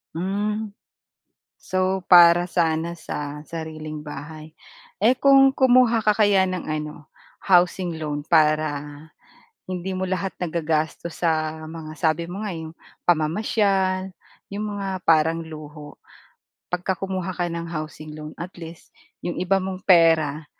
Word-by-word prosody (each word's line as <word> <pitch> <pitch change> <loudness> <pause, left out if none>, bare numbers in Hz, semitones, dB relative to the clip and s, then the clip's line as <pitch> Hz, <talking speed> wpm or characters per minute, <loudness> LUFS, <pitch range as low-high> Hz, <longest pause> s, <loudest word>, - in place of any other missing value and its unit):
Hmm. 205 +4 -2 0.9
So, 185 0 -1
para 175 0 +7
sana 170 -1 0
sa 150 -2 -6
sariling 155 -2 -7
bahay. 155 +1 -9 0.5
Eh, 235 - +6
kung 270 +1 +5
kumuha 250 -3 +4
ka 210 -1 +2
kaya 200 -3 +4
ng 185 -1 -3
ano, 150 -1 -6 0.3
housing 175 -2 +2
loan 145 -1 -3
para 155 -2 +2 0.8
hindi 185 +1 -4
mo 185 - -2
lahat 185 0 -2
nagagastos 165 0 -2
sa 155 -1 0
mga 155 -1 -8
sabi 165 0 0
mo 195 +4 -6
nga, 205 - -3
'yong 160 -1 -7 0.3
pamamasyal, 190 +3 +1 0.4
'yong 210 +1 -3
mga 200 -1 -4 0.2
parang 160 +1 +4
luho. 150 -2 -10 0.7
Pagka 180 +1 -1
kumuha 185 0 -4
ka 175 -1 -2
ng 170 0 -4
housing 155 -1 -7
loan, 155 0 -8
at 175 +2 -7
least 165 -1 -11 0.3
'yong 175 0 -3
iba 195 +2 +2
mong 190 0 -4
pera 160 -3 +4
170 Hz, 130 wpm, -23 LUFS, 155-190 Hz, 0.9 s, para